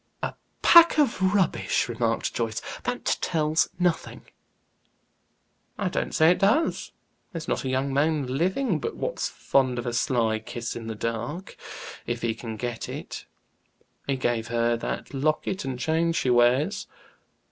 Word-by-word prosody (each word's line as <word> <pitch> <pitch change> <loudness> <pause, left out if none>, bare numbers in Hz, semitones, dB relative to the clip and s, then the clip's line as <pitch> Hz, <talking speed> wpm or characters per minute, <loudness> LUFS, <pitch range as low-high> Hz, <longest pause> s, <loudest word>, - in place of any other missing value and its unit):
"A - - -2 0.3
pack 340 -1 +8
of 280 -10 +2
rubbish!" 190 -5 +1
remarked 115 -1 -1
Joyce. 115 -2 -2 0.3
"That - - -3 0.2
tells 155 0 +1
nothing." 175 -2 -1 1.5
"I - - -1
don't - - -2
say 160 +2 +6
it 180 - +1
does. 250 +12 +2 0.4
There's 165 -5 -6
not - - -1
a - - -1
young 135 +1 0
man 150 0 +2
living 175 - 0
but - - -4
what's - - -2
fond 130 -2 +1
of 120 - -3
a 120 - -2
sly 115 -3 +1
kiss 115 +1 -5
in 115 -1 -6
the 110 - -4
dark, 115 - -4 0.5
if 120 0 -3
he 115 -1 +1
can 110 -1 -7
get 120 +1 -4
it. - - -7 0.8
He 140 - +1
gave 120 -3 -1
her 120 0 +1
that 115 - -5
locket 155 +5 -1
and 130 -2 -3
chain 160 +5 +1
she 130 -6 +1
wears." 125 - +3
130 Hz, 150 wpm, -26 LUFS, 120-165 Hz, 1.5 s, pack